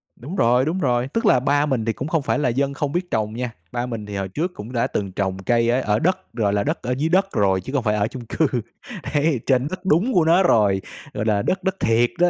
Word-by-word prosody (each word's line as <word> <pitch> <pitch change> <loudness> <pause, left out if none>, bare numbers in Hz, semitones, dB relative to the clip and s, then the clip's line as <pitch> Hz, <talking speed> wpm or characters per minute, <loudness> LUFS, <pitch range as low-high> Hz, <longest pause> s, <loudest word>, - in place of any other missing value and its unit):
Đúng 145 +10 -8
rồi, 125 -3 +3
đúng 160 +5 -1
rồi, 125 -5 +1
tức 230 +11 -2
là 130 - +5
ba 145 +3 +2
mình 130 -7 -1
thì 115 - 0
cũng 135 - -5
không 160 -1 +1
phải 140 - 0
là 145 - +1
dân 140 +3 0
không 140 +1 -2
biết 175 +2 -3
trồng 110 -1 -1
nha, 125 +1 -3 0.2
ba 120 0 -2
mình 115 -4 -5
thì 105 -1 -7
hồi 95 -1 -2
trước 160 - -2
cũng 110 -1 -9
đã 115 - +1
từng 100 -2 -3
trồng 95 0 -2
cây 115 +1 +2
ở 125 +2 +2
ở 105 -3 +1
đất, 185 +5 -1
gọi 105 -4 0
là, 100 0 +1
đất - - -2
ở 125 - -3
dưới 155 +4 0
đất 190 +3 +3
rồi 95 -2 +2
chứ 130 - -8
không 135 -4 +1
phải 105 -2 +1
ở 105 0 +1
chung 120 +1 -8
cư, 160 +7 0 0.7
ấy, 145 -2 +2
trên 130 0 +2
rất 185 +3 -7
đúng 190 +9 +2
của 175 -5 +4
nó 170 +4 +5
rồi, 105 - +3 0.3
gọi 105 - -3
là, 105 -2 +2
đất 190 - -1
đất 190 0 0
thiệt 115 +1 +3
đó. 175 0 +5
125 Hz, 280 wpm, -22 LUFS, 110-155 Hz, 0.7 s, là